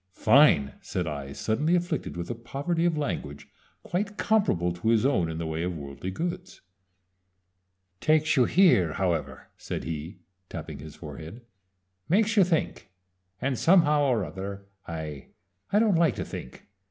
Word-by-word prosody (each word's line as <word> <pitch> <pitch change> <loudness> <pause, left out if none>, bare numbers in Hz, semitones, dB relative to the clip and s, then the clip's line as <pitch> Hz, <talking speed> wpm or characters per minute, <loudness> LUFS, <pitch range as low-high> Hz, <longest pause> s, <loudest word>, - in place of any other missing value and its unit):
"Fine!" 85 - +5
said 90 - -3
I, 70 -3 -5
suddenly 145 - 0
afflicted 175 - -2
with 85 +4 -4
a - - -1
poverty 140 +9 -2
of 170 -3 +1
language 75 - -4 0.4
quite 205 +4 -3
comparable 95 - +1
to 90 +6 -2
his 115 0 +3
own 95 -12 +2
in 80 - -4
the 85 - -3
way 80 0 -3
of 90 0 -2
worldly 70 +5 -6
goods. 175 - -5 1.4
"Takes 155 0 +3
you 130 -3 +5
here, 135 - +4
however," 90 -4 -2
said - - -5
he, 80 +3 -6 0.3
tapping - - -7
his 75 0 -10
forehead. 80 - -9 0.6
"Makes 210 +4 +3
you 200 - +7
think 165 - -1 0.5
and 135 -2 -1
somehow 165 -4 +5
or 120 -8 +1
other 100 +4 -7 0.2
I 80 -4 -6 0.4
I 205 - +3
don't 215 -2 +4
like 165 - +3
to - - -4
think. 65 - -9
115 Hz, 155 wpm, -27 LUFS, -, 1.4 s, you